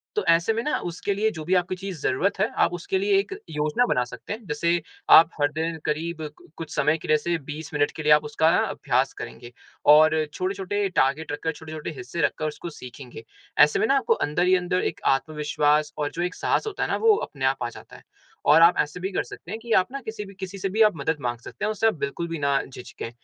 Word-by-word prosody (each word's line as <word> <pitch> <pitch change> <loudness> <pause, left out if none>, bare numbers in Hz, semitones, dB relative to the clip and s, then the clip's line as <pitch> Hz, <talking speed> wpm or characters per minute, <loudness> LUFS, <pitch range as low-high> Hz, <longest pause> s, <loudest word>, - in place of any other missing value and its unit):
तो 430 - 0
ऐसे 170 +6 +4
में 225 - -1
ना, 300 - 0
उसके 175 +3 -3
लिए 210 +2 +1
जो 160 -6 -7
भी 180 - 0
आपकी 180 +1 0
चीज़ 185 -3 -7
ज़रुरत 190 +10 0
है, 205 - +3
आप - - +3
उसके 175 - -2
लिए 400 0 +3
एक 395 - -4 0.2
योजना 150 +9 +1
बना 125 - +2
सकते 125 - -7
हैं। 220 +1 -9
जैसे 170 +3 0 0.3
आप 165 - +9
हर 145 0 +3
दिन 160 +2 -3
करीब 160 +2 -2 0.2
कु - - -19
कुछ 165 - -7
समय 150 +2 +2
के - - -10
लिए, 155 - +4
जैसे 170 +3 -1
20 155 +2 -7
मिनट 145 -1 +1
के 155 - -5
लिए 150 - +3
आप 150 0 +4
उसका 160 +2 +2
ना 180 - +3
अभ्यास - - 0
करेंगे 120 0 -9 0.4
और 155 +1 +6 0.2
छोटे-छोटे 195 +2 -2
टारगेट 140 +4 +1
रखकर, 160 +2 -2
छोटे-छोटे 155 0 -7
हिस्से 125 +7 -4
रखकर 155 0 0
उसको 155 +3 -6
सीखेंगे। 125 -5 -11 0.3
ऐसे 150 0 +5
में - - +2
ना, 275 - +3
आपको 370 - +2
अंदर 150 +5 0
ही 185 - +5
अंदर 180 0 0
एक - - -21 0.2
आत्मविश्वास 150 0 0
और 145 -1 -2
जो 170 - -4
एक 180 +1 -3
साहस - - 0
होता 420 - -3
है - - -2
ना, - - +1
वो 445 -1 +5
अपने 135 - -4
आप 135 -1 +1
आ 120 - -2
जाता - - -13
है - - -15 0.4
और 155 +2 +6
आप 170 +1 +7
ऐसे 150 +4 -1
भी 190 +2 -3
कर - - 0
सकते 170 - -11
हैं 220 - -4
कि 230 0 -9
आप 185 - -3
ना 275 - -4
किसी 220 -3 -6
भी 195 - -12
किसी 190 +1 -6
से 195 0 -2
भी 215 +4 0
आप 215 -1 +6
मदद 155 +2 -1
माँग 120 -1 -2
सकते 115 - -10
हैं - - +1
और - - 0
उससे 215 +1 +1
आप 220 - +3
बिल्कुल 140 +5 -3
भी 165 0 -4
ना 140 -1 +2
झिझकें। 125 -2 -8
165 Hz, 255 wpm, -25 LUFS, 150-195 Hz, 0.4 s, आप